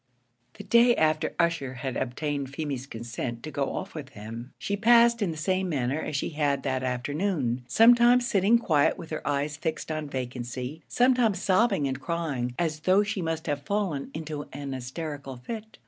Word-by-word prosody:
The - - -9
day 235 +1 +5
after 155 0 +1
Ussher 165 -7 0
had 130 0 -4
obtained 140 +2 -2
Feemy's 140 -2 -4
consent 120 0 -5
to 155 - -6
go 140 -2 -2
off - - -5
with 150 -4 -7
him, 115 +4 -8
she 200 - -2
passed 235 +2 +5
in 200 - +1
the 160 - -4
same 185 +3 0
manner 140 0 -1
as 150 - -4
she 140 - -1
had 145 -3 0
that 130 -2 -1
afternoon 130 0 -1
sometimes 240 - +6
sitting 215 0 +4
quiet 160 -11 +2
with 165 -2 -9
her 155 - -3
eyes 145 +1 -1
fixed 160 +1 -3
on 155 -2 -3
vacancy 125 +2 -5
sometimes 245 -5 +3
sobbing 195 -6 +2
and 130 0 -4
crying, 140 -7 -2
as 160 -3 -1
though 185 +6 +4
she 205 -2 -3
must 160 -1 -2
have 145 -2 -1
fallen 180 -4 -2
into 155 -2 -5
an 140 0 -5
hysterical 135 +1 -6
fit. 220 - -8
155 Hz, 180 wpm, -27 LUFS, 135-190 Hz, -, sometimes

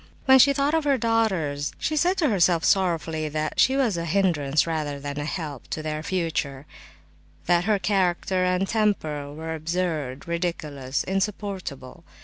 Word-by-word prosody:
When 265 0 +7
she 280 +2 +7
thought 280 +2 +1
of 320 -1 +2
her 280 -2 +2
daughters, 190 - 0
she 310 - -2
said 355 +5 +2
to 310 -5 +2
herself 175 -5 +3
sorrowfully 165 -4 +1
that 155 +1 -3
she 265 - +5
was 235 -9 +1
a 170 - -2
hindrance 160 -5 +1
rather 155 -3 -3
than 145 +1 -5
a 145 - -3
help 150 -4 -5
to 155 - -4
their 155 0 -3
future, 155 -6 -2 0.8
that 175 0 +2
her 215 -1 +3
character 185 -2 +1
and 180 +1 +1
temper 160 -10 -1
were 160 +2 -5
absurd, 160 -4 -3
ridiculous, 155 -6 -2
insupportable. 190 - -4
170 Hz, 155 wpm, -25 LUFS, 150-200 Hz, 0.8 s, When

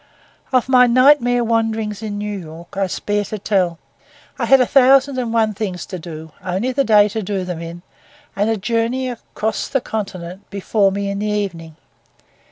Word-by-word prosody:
Of 255 -2 +2
my 250 -1 +6
nightmare 245 -1 +4
wanderings 225 -2 -1
in 210 -2 -4
New 210 0 -3
York 165 +2 -11
I 195 0 0
spare 205 +3 -1
to 215 - -5
tell. 185 -4 0 0.6
I - - 0
had 270 - +6
a 250 - +4
thousand 270 +1 +4
and 240 -2 -2
one 220 -2 +2
things 190 -4 -4
to 185 - -7
do; 160 -1 -9
only 190 +7 -1
the 275 +2 +1
day 210 -4 +5
to 220 +2 -3
do 195 -1 -2
them 180 -2 -5
in, 170 +1 -8 0.5
and 205 +2 +1
a 225 - +1
journey 230 +5 -1
across 220 -2 -4
the 270 - 0
continent 195 -4 -6
before 200 0 +1
me 200 +1 -2
in 200 - -3
the 210 - -2
evening. 180 -7 -3
210 Hz, 180 wpm, -19 LUFS, 190-235 Hz, 0.6 s, my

